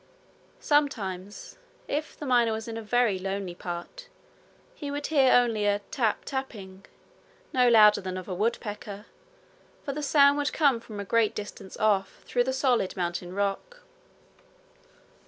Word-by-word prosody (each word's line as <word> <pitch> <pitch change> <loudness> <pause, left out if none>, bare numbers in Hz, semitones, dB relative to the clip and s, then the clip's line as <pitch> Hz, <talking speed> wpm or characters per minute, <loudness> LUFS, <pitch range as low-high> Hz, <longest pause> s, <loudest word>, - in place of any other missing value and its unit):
Sometimes, 205 -10 -1 0.3
if 300 +2 -3
the 295 - -7
miner 240 -3 +3
was 220 +1 -5
in 225 - -5
a 225 - -4
very 225 -3 +1
lonely 195 -1 -4
part, 175 - -7 0.7
he 290 - -7
would 285 0 -4
hear 275 -4 +4
only 230 -4 +3
a 205 0 +3
tap 230 -5 0
tapping, 205 -8 -6 0.7
no 250 -1 +4
louder 210 -3 +6
than 185 -1 -5
that 185 - -4
of - - -16
a 190 - -4
woodpecker, 210 0 -3 0.8
for 280 - -3
the 300 - -4
sound 285 0 +4
would 290 - -1
come 280 -6 +3
from 215 -2 -9
a 200 - -4
great 225 +1 +2
distance 205 -2 -8
off 205 -3 0
through 245 -1 +1
the 260 - 0
solid 255 -8 +1
mountain 175 0 -3
rock. 205 - -3
225 Hz, 155 wpm, -27 LUFS, 195-265 Hz, 0.8 s, louder